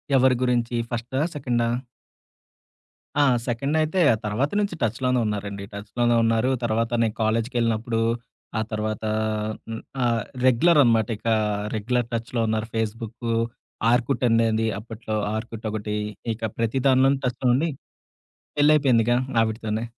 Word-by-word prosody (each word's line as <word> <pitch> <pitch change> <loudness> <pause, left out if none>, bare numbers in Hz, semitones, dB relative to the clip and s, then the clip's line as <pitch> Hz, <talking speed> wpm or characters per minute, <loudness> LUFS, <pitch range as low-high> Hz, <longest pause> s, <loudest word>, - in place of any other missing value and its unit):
ఎవరి 130 -1 +5
గురించి? 120 -1 +1
ఫస్టా, 120 +2 -3 0.2
సెకండా? 120 -4 0 1.5
ఆ! - - +6 0.2
సెకండ్ 135 +6 -1
అయితే 160 +4 0 0.3
తర్వాత 115 +8 0
నుంచి 200 -4 -1
టచ్‌ 115 +1 0
లోనే 125 -1 +2
ఉన్నారండి. 100 -1 -3
టచ్‌ 100 +1 -8
లోనే 120 0 +4
ఉన్నారు. 115 +2 +2
తర్వాత 115 0 0
నేను 110 -2 0
కాలేజీకెళ్లినప్పుడు 115 0 0 0.6
ఆ - - +1
తర్వాత 110 0 -2 0.7
హ్మ్, 115 - -5 0.2
ఆహ్, 115 -2 +2 0.2
రెగ్యులర్ 150 +6 +5
అనమాట. 115 -3 +3
ఇక 110 - -8 0.5
రెగ్యులర్ 120 +2 0
టచ్‌లో 115 +1 -2
ఉన్నారు. 110 0 -1
ఫేస్‌బుకు, 115 +1 -3 0.6
ఆర్కుట్ 125 +2 +1
అనేది 115 -1 +2
అప్పట్లో 110 0 -6 0.2
ఆర్కుట్ 115 0 -5
ఒకటి. 105 0 -3 0.4
ఇక 110 +1 -11 0.2
ప్రతి 115 +3 0
దానిలోను 135 +1 +4
టచ్‌లో 125 +1 -1
ఉండి 155 +6 +1 0.9
పెళ్లి 145 +1 +5
అయిపోయిందిగా 120 -5 +3 0.3
ఆవిడతోనే. 110 0 -1
115 Hz, 125 wpm, -24 LUFS, 110-125 Hz, 1.5 s, ఆ